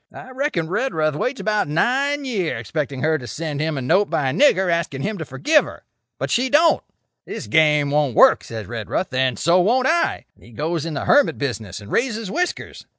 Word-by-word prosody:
"I 260 - -11
reckon 260 - -2
Redruth 160 - -1
waits 255 - -3
about 210 -6 0
nine 275 - 0
year 195 - -2
expecting 140 +3 -4
her 155 0 +1
to 120 - -9
send 150 +5 -5
him 155 -1 -2
a 135 - -3
note 185 +10 +2
by 135 -3 0
a - - -4
nigger 190 -10 +3
asking 170 -5 -2
him 210 +1 -3
to 160 - -5
forgive 290 - +2
her. - - -11 0.3
But - - -4
she 255 +2 +1
don't. 320 +5 +4 0.5
'This - - -6
game 150 -2 +3
won't 145 -5 +1
work,' - - +6
says 110 -2 -7
Redruth; 115 - -4
'then 130 -3 0
so 170 - +3
won't 245 +7 +2
I.' 335 +4 +1
And - - -25
he 120 - -16
goes 160 +5 -3
in 160 - -5
the - - -3
hermit 290 -1 +3
business 110 -9 -4
and 100 0 -12
raises 225 -5 -1
whiskers. 355 +2 -4
160 Hz, 210 wpm, -21 LUFS, -, 0.5 s, work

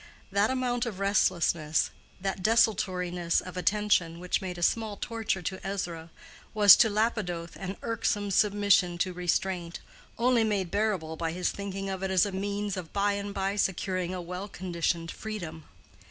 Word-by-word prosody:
That 200 +2 +3
amount 250 -2 0
of 200 -5 -5
restlessness, 170 -5 +2 0.3
that 195 0 -3
desultoriness 180 -5 +2
of 185 - -8
attention, 180 -3 +1
which 180 +3 -1
made 180 -2 -5
a 175 - -4
small 220 +1 +1
torture 220 -5 -2
to 190 +3 -4
Ezra, 175 -4 -4 0.5
was 205 -2 +10
to 225 - +5
Lapidoth 205 -6 -1
an 195 0 -6
irksome 205 -3 -1
submission 200 -3 +3
to 185 +1 -1
restraint, 175 0 -1 0.4
only 240 -1 +3
made 200 -5 -1
bearable 195 -7 -1
by 165 0 -2
his 180 +1 0
thinking 195 -1 -5
of 190 -1 -4
it 190 - -1
as 190 0 +4
a 200 - -3
means 200 +1 -2
of 175 -3 -6
by 205 0 +1
and 200 0 -4
by 195 0 -1
securing 185 -2 -1
a 185 -1 -4
well 180 +3 -5
conditioned 170 -3 -2
freedom. 175 -8 -6
190 Hz, 160 wpm, -28 LUFS, 175-205 Hz, 0.5 s, was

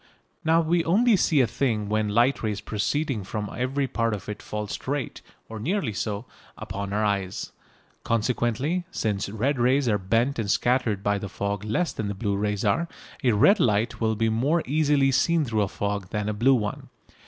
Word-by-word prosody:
Now 165 +1 +4
we 165 +1 +1
only 220 +8 +4
see 160 -5 +3
a - - +4
thing 110 -3 -1
when 105 0 0
light 120 +6 +2
rays 105 -3 -2
proceeding 110 +3 -1
from 105 +1 -4
every 135 +3 0
part 115 -3 0
of 100 -1 -10
it 105 -1 -5
fall 105 0 -4
straight 135 +6 -4 0.3
(or 110 -1 -7
nearly 170 - -1
so) 105 +1 -3 0.3
upon 100 +1 -5
our 105 +1 +1
eyes. 100 -3 -2 0.5
Consequently, 120 +8 0
since 105 - -2
red 120 +6 -1
rays 130 +2 +3
are 105 -3 +2
bent 115 +8 +1
and 105 -3 -2
scattered 120 -4 +1
by 100 0 +1
the 100 - -6
fog 100 +2 -3
less 115 +11 -1
than 105 -2 -3
blue 100 0 -2
rays 105 0 -1
are, 165 +12 +2 0.4
a 125 -3 +4
red 195 - +5
light 115 -4 +1
will 110 -1 +1
be 115 +2 +1
more 135 +10 +1
easily 145 -1 +2
seen 165 +4 +2
through 110 -4 0
a 100 - +1
fog 100 -1 -3
than 105 0 -2
a 105 - 0
blue 125 +6 +4
one. 105 -4 -3
115 Hz, 190 wpm, -25 LUFS, 105-135 Hz, 0.5 s, red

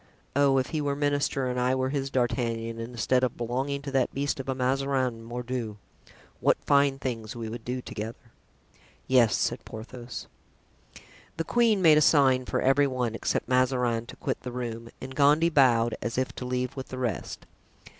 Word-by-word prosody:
Oh! 140 -1 +4
if 130 - 0
he 155 -2 -1
were 140 -1 -1
minister 145 -2 0
and 125 0 -1
I 125 +1 +2
were 130 0 0
his 135 -1 -2
D'Artagnan, 115 -3 -1
instead 120 +2 0
of 130 - 0
belonging 130 +4 -2
to 140 - -5
that 135 -2 +1
beast 140 0 -1
of 135 - -5
a 130 - 0
Mazarin, 130 -2 0
mordieu! 120 -2 -4 0.6
what - - +3
fine 140 -1 +4
things 115 -5 -4
we 115 -1 -5
would 115 0 -7
do 125 +1 -4
together!" 115 +2 -7 0.7
"Yes," 120 -6 +4
said - - -1
Porthos.) 120 +2 -8 1.1
The 165 - 0
queen 225 -2 +2
made 155 -2 +7
a - - +1
sign 135 -4 +4
for - - -1
every 135 +2 +4
one, 125 -4 -1
except 115 - -1
Mazarin, 125 -3 +1
to - - -10
quit - - -3
the 125 - -6
room; 115 -2 -5
and 130 +1 -7
Gondy 150 +4 +4
bowed, 120 -6 +4
as 120 0 -3
if 130 0 -1
to 125 - -5
leave 125 0 -2
with 135 -1 -6
the 130 - -7
rest. 120 -7 -3
130 Hz, 180 wpm, -27 LUFS, 120-135 Hz, 1.1 s, made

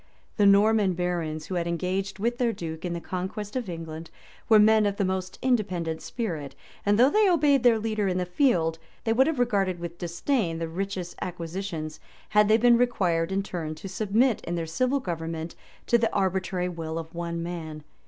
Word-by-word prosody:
The 205 -2 +5
Norman 200 -1 +5
barons, 170 -3 -2
who - - -6
had 170 -1 -1
engaged 185 +3 -2
with 235 +4 -1
their 240 -2 +2
duke 160 -6 -6
in 175 - -2
the 170 - -3
conquest 190 +5 -5
of 245 -6 -2
England, 165 -1 -7 0.4
were 220 - +8
men 215 0 +5
of 200 - -1
the 200 - +1
most 185 0 -3
independent 185 -10 0
spirit; 165 - -4 0.3
and 205 0 +3
though 255 +4 +6
they 425 -2 +4
obeyed 295 -6 +4
their 240 -2 +5
leader 215 -2 -1
in 185 -1 0
the 180 - 0
field, 175 - +1 0.2
they 225 - +1
would 265 +4 +4
have 320 -3 0
regarded 200 -7 +1
with 170 0 -7
disdain 175 - -1
the 165 0 -3
richest 180 0 -4
acquisitions, 165 -2 -5 0.3
had 210 0 +4
they 215 +1 +5
been 240 +1 +5
required, 180 -9 +1
in 195 +1 +1
return, 165 -5 -5
to 175 - -8
submit, 215 +5 +1
in 175 - -2
their 165 -1 -2
civil 255 - 0
government, 165 -5 -4 0.3
to 235 - +3
the 225 - +1
arbitrary 185 -2 0
will 165 -2 -5
of 165 0 -6
one 170 0 -3
man. 160 -3 -6
185 Hz, 195 wpm, -26 LUFS, 170-220 Hz, 0.4 s, were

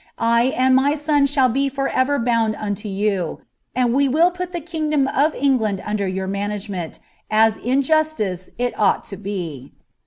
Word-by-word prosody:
I 235 +1 +3
and 260 +1 +4
my 280 +3 +3
«m 290 -2 +4
shall 275 -2 +3
be 275 +3 0
for 275 0 -2
ever 270 +2 +1
bound 230 -3 +1
unio 205 0 -4
you, 195 -4 -1 0.3
and 245 -2 +2
we 275 +1 +3
will 330 +6 +4
put 360 0 -5
the 350 - -3
kingdom 305 -4 -1
of 295 +4 +1
England 235 -8 +1
under 210 -2 -1
your 190 0 -3
management, 200 -3 -4 0.3
as 220 0 +4
in 260 +4 0
justice 260 - 0
it 245 0 -1
ought 210 - +2
to 195 - -8
be." 175 -9 -6
240 Hz, 175 wpm, -21 LUFS, 205-280 Hz, 0.3 s, and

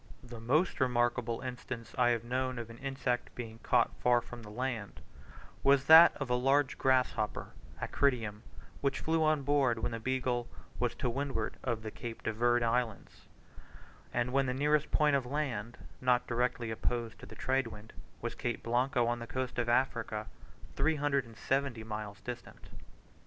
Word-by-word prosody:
The 120 -2 -9
most 140 +10 +1
remarkable 120 -2 +1
instance 125 -2 -6
I 125 -2 +4
have 115 -2 +1
known 130 +1 -1
of 115 -1 -6
an 115 - -12
insect 135 -3 -2
being 115 -2 -7
caught 120 0 +2
far 120 -1 +4
from 120 0 -10
the 105 - -10
land, 115 -2 -4 0.6
was 140 -1 +4
that 160 +2 +9
of 135 - -3
a 125 - 0
large 135 +3 +2
grasshopper 125 -5 +1 0.3
(Acrydium), 115 -7 0 0.4
which 140 -1 0
flew 160 0 +1
on 155 -2 +2
board, 135 -4 +2
when 115 - -2
the 115 - -4
Beagle 125 0 -1 0.3
was 120 -1 0
to - - -2
windward 130 -3 -2
of 115 -3 -2
the 110 - -5
Cape 115 0 -7
de 110 - -1
Verd 120 +2 +2
Islands, 115 -2 -2 0.8
and 120 +1 -1
when 135 0 +3
the 125 - -1
nearest 150 +2 +2
point 150 -2 +3
of 130 -3 0
land, 125 -5 -3 0.2
not 125 -1 +3
directly 120 -1 -1
opposed 115 0 -2
to 125 - -10
the - - -11
trade 130 -1 0
wind, 110 0 -11 0.3
was 120 - -2
Cape 120 -3 -3
Blanco 125 +1 +1
on 120 0 0
the 115 - -7
coast 130 0 -3
of 120 -1 0
Africa, 115 -3 0 0.5
370 140 -4 0
miles 105 -2 -6
distant. 125 -1 -8
125 Hz, 165 wpm, -32 LUFS, 115-135 Hz, 0.8 s, that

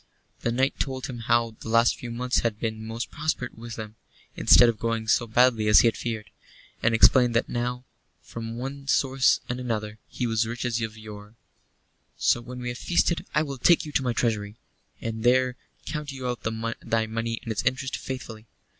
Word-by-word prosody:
The 120 - -1
knight 130 +3 0
told 130 -2 -2
him 125 -3 -6
how 115 -1 +1
the - - -8
last 115 +1 +4
few 120 - -8
months 125 +2 0
had 110 -2 -1
been 110 -1 -3
most 115 +2 -5
prosperous 150 -5 -2
with 115 0 -8
him, 110 0 -8 0.4
instead 120 - +7
of 115 -2 0
going 115 -1 -2
so 120 +1 +2
badly 115 -1 +3
as 105 - +8
he - - +4
had 115 - +1
feared; 110 -2 -5 0.5
and 115 0 +3
explained 120 +1 +6
that 115 - +2
now, 125 +1 -3 0.4
from 115 0 -7
one 135 +2 -6
source 135 -1 +3
and 125 +1 -3
another, 110 -3 -3
he 125 - -3
was 115 -2 0
as 115 - +1
rich 120 +2 -4
as 120 -1 -1
of 110 -1 -4
yore. 105 0 -11 0.8
"So 120 - +2
when 125 +1 -9
we 125 - -3
have 120 - -6
feasted 170 +1 +1
I 150 - +4
will 140 -3 -6
take 170 +5 +4
you 150 - -7
to 140 - +1
my 125 -2 -1
treasury, 105 -3 -1 0.5
and 110 -1 -4
there 125 0 +3 0.3
count 150 -1 -4
you 130 -2 -5
out 125 -1 -3 0.4
thy 115 -1 +1
money 115 +1 -3
and 115 - -4
its 110 - -1
interest 130 +1 -1
faithfully. 115 -4 -7
120 Hz, 200 wpm, -26 LUFS, 115-125 Hz, 0.8 s, as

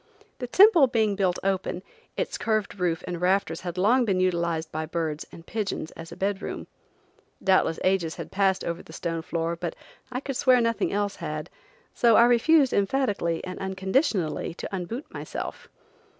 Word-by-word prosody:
The 250 - -4
temple 355 - +7
being 220 -4 +1
built 185 -3 +1
open, 190 -1 -1 0.3
its - - -2
curved 215 -3 -1
roof 175 -1 0
and 175 -1 -5
rafters 180 -2 +1
had 180 -1 -5
long 235 +7 +4
been 195 -5 +1
utilized 170 -3 0
by 155 0 -3
birds 160 -2 -3
and 165 - -12
pigeons 200 -7 -3
as 165 0 -10
a - - -7
bed 195 +1 -1
room. - - -5 0.8
Doubtless 185 -4 +3
ages 185 -4 +1
had - - -8
passed 195 -1 +2
over 170 0 -3
the 160 - -14
stone 165 0 -3
floor, 165 +1 -2
but 170 -1 -4 0.4
I 255 - -2
could 275 -1 -4
swear 255 -1 +5
nothing 230 -2 0
else 205 0 -1
had, 155 0 -5 0.4
so 235 -2 +4
I 235 - +8
refused 265 +4 +4
emphatically 200 -6 0
and 185 0 -6
unconditionally 190 - 0
to 195 - -5
un 180 -2 -3
boot 235 - -6
myself. - - -6
190 Hz, 175 wpm, -26 LUFS, 170-230 Hz, 0.8 s, I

